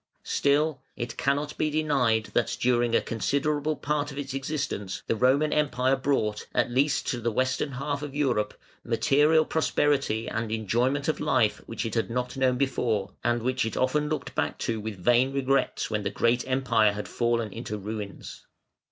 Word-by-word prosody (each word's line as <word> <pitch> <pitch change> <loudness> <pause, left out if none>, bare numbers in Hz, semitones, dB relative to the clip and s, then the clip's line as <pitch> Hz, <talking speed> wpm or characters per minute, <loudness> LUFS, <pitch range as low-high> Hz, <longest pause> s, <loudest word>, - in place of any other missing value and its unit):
Still 145 0 +1
it 120 -1 -5
cannot 145 +2 -1
be 155 - +2
denied 140 -8 +1
that 120 - 0
during 120 -1 +2
a - - +4
considerable 145 +5 0
part 150 0 -2
of 140 - -9
its 140 -2 -4
existence 135 -8 -3
the - - 0
Roman 135 +6 +3
Empire 135 -3 +2
brought, 130 -6 -1
at - - +2
least 140 +3 +2
to 120 - -2
the 115 +1 0
western 130 +4 0
half 140 +2 -3
of 145 -2 -6
Europe, 125 -8 0 0.2
material 155 +3 +3
prosperity 140 -8 +1
and 110 0 -3
enjoyment 120 +6 0
of 155 - 0
life 120 -9 +2
which 115 - -4
it 115 - -3
had 115 0 0
not 125 +2 -2
known 130 -2 +2
before, 115 -7 0
and 120 0 +1
which 130 +1 0
it 110 - -3
often 150 +3 +1
looked 155 - -3
back - - -1
to 115 -2 -2
with 105 -1 -5
vain 120 +8 +3
regrets 135 -3 0
when 105 -1 0
the 100 - -1
great 120 +4 +1
Empire 120 -5 +3
had 105 +1 -5
fallen 115 -3 0
into 110 -2 -5
ruins. 105 0 -7
130 Hz, 175 wpm, -27 LUFS, 115-145 Hz, 0.2 s, a